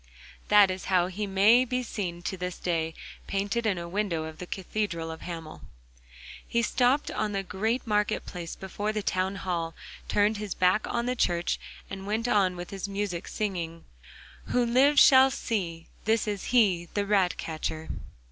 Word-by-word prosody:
That 205 -2 +6
is 185 0 -5
how 180 -2 +3
he 205 +3 -3
may 205 +6 +5
be 255 0 -2
seen 175 -7 -4
to 190 - -2
this 180 -1 -4
day, 165 -2 -1 0.3
painted 205 +4 -1
on 200 -4 +1
a 170 0 -5
window 180 -3 -1
of 160 0 -8
the 180 - -6
cathedral 185 -4 -3
of 160 - -8
Hamel. 165 -3 -7 0.9
He 235 0 +1
stopped 255 +5 +2
on 210 -1 -2
the 195 0 -1
great 220 +7 -1
market 210 -1 0
place 170 -2 -6
before 205 +2 -3
the 215 -1 -2
town 185 +1 0
hall, 170 -4 -3 0.3
turned 210 +1 +2
his 205 -2 -4
back 185 +3 +2
on 235 0 -1
the 250 +1 0
church 175 -6 +1 0.3
and 195 0 -7
went 220 +3 -1
on 195 -5 +3
with 175 0 -7
his 195 0 -4
music, 195 -3 -3
singing: 170 -6 -3 0.6
'Who 245 -1 +1
lives 270 +5 +5
shall 265 0 +7
see: 180 -11 -3 0.2
This 220 0 +2
is 205 -2 -3
he, 190 -9 +3
The 205 -1 +1
ratcatcher. 165 -5 -1
195 Hz, 170 wpm, -28 LUFS, 175-215 Hz, 0.9 s, shall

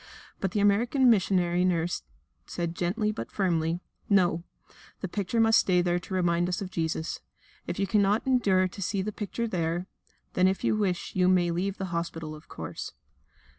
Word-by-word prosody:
But 195 - 0
the 205 - -1
American 240 +6 +4
missionary 180 -4 +2
nurse 175 -1 0 0.5
said 170 -1 -3
gently, 210 +6 0
but 215 - -6
firmly: 170 -3 0 0.3
"No, 175 -4 +3 0.6
the - - -2
picture 200 +4 -2
must 225 0 +6
stay 180 -2 +3
there 175 0 +1
to 185 - -9
remind 175 -1 +2
us 180 - -1
of 190 -2 -5
Jesus. 160 -2 -2 0.5
If - - -3
you 200 - +1
cannot 205 +1 +2
endure 205 -8 +3
to 190 +2 -10
see 195 +1 -1
the 215 - -3
picture 215 +3 -3
there, 175 -3 -1 0.5
then 185 +1 +4
if 190 0 -1
you - - +2
wish 190 -4 -1
you 180 -1 +3
may 180 -2 +3
leave 190 +3 -2
the 190 -3 -4
hospital, 165 -2 -3
of 155 0 -12
course." - - -7
185 Hz, 175 wpm, -28 LUFS, 175-205 Hz, 0.6 s, must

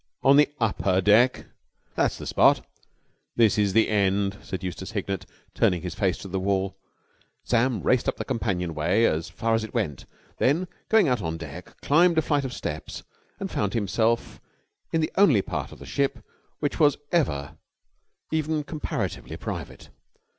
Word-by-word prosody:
"On 135 +1 +6
the 145 0 +5
upper 100 -4 +1
deck?" 110 +6 +4 0.5
"That's - - 0
the - - -8
spot." - - +4 0.7
"This 110 -2 +4
is 100 -2 +2
the 115 - +4
end," 100 -1 +1
said 95 -1 -6
Eustace 95 +3 -5
Hignett, 100 -3 -3 0.3
turning 90 -1 +1
his 90 -2 -4
face 95 -3 0
to - - -7
the 95 0 -2
wall. 95 0 0 0.7
Sam 120 -1 +1
raced 130 -1 +2
up - - -4
the - - -4
companion 95 -9 -2
way 90 +9 +2
as 80 -3 0
far 115 +6 -1
as 115 0 +1
it 110 - -8
went; 85 - -2 0.3
then, 165 +8 +2 0.2
going 220 -6 +5
out 125 -5 +1
on 80 -1 -3
deck, - - -10
climbed 170 +3 +4
a 160 - +4
flight 145 -2 +1
of 130 - -4
steps - - -6 0.4
and - - -4
found 100 0 -1
himself 115 +2 0 0.5
in 165 - +1
the 155 - -1
only 150 - +5
part - - -4
of - - -11
the - - -11
ship 135 -5 -1 0.4
which 145 +2 -1
was 145 -3 +4
ever 75 - 0 0.7
even 155 -1 0
comparatively 155 0 -4
private. - - -7
110 Hz, 170 wpm, -25 LUFS, 95-140 Hz, 0.7 s, On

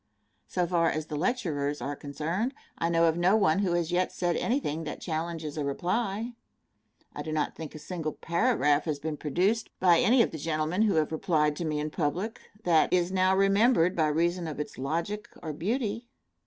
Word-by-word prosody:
So 180 -1 0
far 170 -1 +2
as 155 0 -2
the 155 - -5
lecturers 150 - -1
are 140 +4 -3
concerned, 165 - -3 0.2
I 165 - -1
know 170 0 +3
of 165 0 +2
no 180 +4 +4
one 195 -5 +3
who 190 -4 +1
has 175 -1 0
yet 180 +1 +1
said 175 -2 -1
anything 165 - -1
that 150 - -5
challenges 160 -2 -4
a - - -1
reply. 200 - -1 0.8
I - - -5
do 155 - -5
not 155 -1 -1
think 155 -2 -8
a - - -5
single 155 0 -4
paragraph 170 - +1
has 155 -3 -1
been 155 +1 -4
produced 185 +10 0
by 175 -3 +5
any 240 +1 +5
of - - -2
the 160 - -6
gentlemen 155 +4 -1
who 215 -4 +3
have 155 -1 +1
replied 155 -2 +1
to 170 - -3
me 150 -1 -1
in 150 +1 -3
public, 180 +8 -2 0.2
that 165 -3 +3
is 180 0 +2
now 185 0 +3
remembered 195 -1 +4
by 160 -2 +2
reason 170 +3 0
of 150 -2 -5
its 150 - -5
logic 170 +10 -2
or 155 -2 -4
beauty. 225 - -2
170 Hz, 195 wpm, -28 LUFS, 155-190 Hz, 0.8 s, by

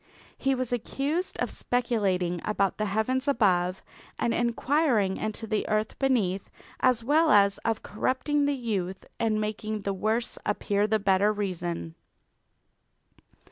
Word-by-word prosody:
He 270 0 0
was 255 -1 -2
accused 280 - -2
of - - -1
speculating 195 -8 0
about 200 -2 0
the 215 - 0
heavens 255 +7 0
above 185 -8 +2 0.3
and 235 - 0
inquiring 235 -3 +1
into 215 +1 -3
the 215 -1 -1
earth 215 0 -1
beneath 210 -9 +1 0.3
as 250 -3 +3
well 310 +6 +3
as 200 -4 +5
of 225 +1 -2
corrupting 285 +6 0
the 285 0 +1
youth 195 -6 -3
and 220 -2 +1
making 215 0 -3
the 200 0 -2
worse 220 +5 -1
appear 205 0 0
the 220 0 +2
better 195 0 +3
reason. 175 -5 -3
215 Hz, 135 wpm, -27 LUFS, 200-245 Hz, 0.3 s, as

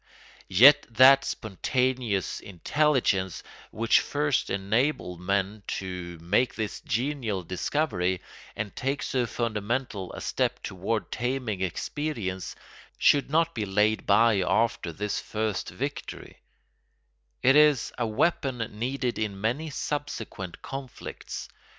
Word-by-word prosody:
Yet 140 +10 +7
that 130 +4 +7
spontaneous 120 0 -1
intelligence 100 - 0 0.3
which 115 +1 +3
first 145 -2 0
enabled 100 - 0
men 100 +2 -1 0.2
to 90 -2 -6
make 105 +8 +2
this 110 -2 -4
genial 115 -5 -2
discovery 95 - -1 0.4
and 105 -1 -4
take 135 +2 -2
so 125 -2 0
fundamental 110 -2 -2
a - - -6
step - - -1
toward 100 +4 -3
taming 120 -5 -2
experience 95 - -3 0.4
should 145 -1 +4
not 165 +2 +2
be 110 - -2
laid 105 +3 +1
by 110 +1 +5
after 100 -1 +1
this 105 +5 -2
first 110 -2 -2
victory; - - -6 1.0
it 135 +2 +6
is 150 -3 +4
a 120 - -1
weapon 130 +3 +1 0.2
needed 125 0 -1
in 105 -3 -2
many 125 +10 -1
subsequent 130 - -5
conflicts. 135 -2 -7
115 Hz, 110 wpm, -27 LUFS, 95-135 Hz, 1.0 s, Yet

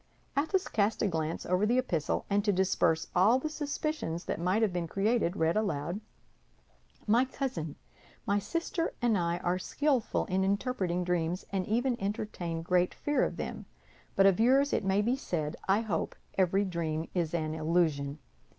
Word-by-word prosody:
Athos 320 +7 +1
cast 210 +2 +1
a - - +3
glance 160 -2 -2
over 180 +3 +1
the 235 +4 +3
epistle, 170 - 0
and 200 0 +1
to 205 - +3
disperse 180 -4 +2
all 210 +7 +5
the 310 +4 -3
suspicions 295 - -3
that - - -2
might 185 +6 +2
have 205 -5 +1
been 175 -2 -2
created, 195 0 +1
read 165 -2 +1
aloud: 190 -3 -1 1.0
"MY 235 +4 +4
COUSIN, 245 - -4 0.5
My 200 +1 +2
sister 335 - -2
and 240 -3 +2
I 170 -2 0
are 175 +1 -1
skillful 275 +3 0
in 190 +1 0
interpreting 195 -3 0
dreams, 175 0 -1
and 190 -2 -1
even 240 +2 0
entertain 190 -5 -3
great 180 +1 +2
fear 290 -2 +1
of - - -2
them; - - -5 0.5
but 195 - +5
of 195 -1 +5
yours 270 +5 +4
it - - +1
may 195 +2 +2
be 240 +4 +2
said, 160 - -3
I 195 +3 +4
hope, 195 -8 -2 0.2
every 195 +2 +2
dream 165 -3 -2
is 170 -2 0
an 155 -2 -1
illusion. 155 -3 +1
190 Hz, 170 wpm, -30 LUFS, 170-230 Hz, 1.0 s, all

